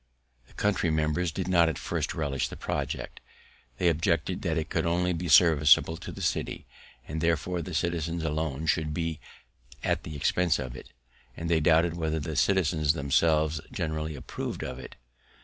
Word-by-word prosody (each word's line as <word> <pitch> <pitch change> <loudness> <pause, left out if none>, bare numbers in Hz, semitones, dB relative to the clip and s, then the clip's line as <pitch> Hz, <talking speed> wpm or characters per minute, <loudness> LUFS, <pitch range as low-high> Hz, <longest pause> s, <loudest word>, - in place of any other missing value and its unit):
The - - -22
country 100 -4 +1
members 80 +2 0
did - - -4
not 85 -3 +4
at 80 - -3
first - - -3
relish 70 -3 -1
the - - -8
project; - - -4 0.6
they 90 - +1
objected 85 +1 +1
that 80 -3 -1
it 80 0 -1
could - - 0
only 90 +1 +1
be 85 +1 -3
serviceable 80 0 +6
to - - -8
the - - -7
city, - - -2 0.4
and 80 +1 -4
therefore 85 +2 0
the 90 -1 -6
citizens 85 0 -1
alone 80 -1 -2
should 80 -1 0
be 80 -2 -2 0.6
at - - 0
the 75 - -8
expense 85 +3 +2
of 65 -3 -5
it; - - -11 0.5
and 85 +1 -3
they 80 - +4
doubted 80 +2 +3
whether 80 -1 -1
the 80 +1 -4
citizens 80 -5 +2
themselves 80 +1 +2
generally 80 -1 -3
approv'd 70 - -5
of 65 0 -5
it. 65 - -10
80 Hz, 170 wpm, -28 LUFS, 75-85 Hz, 0.6 s, serviceable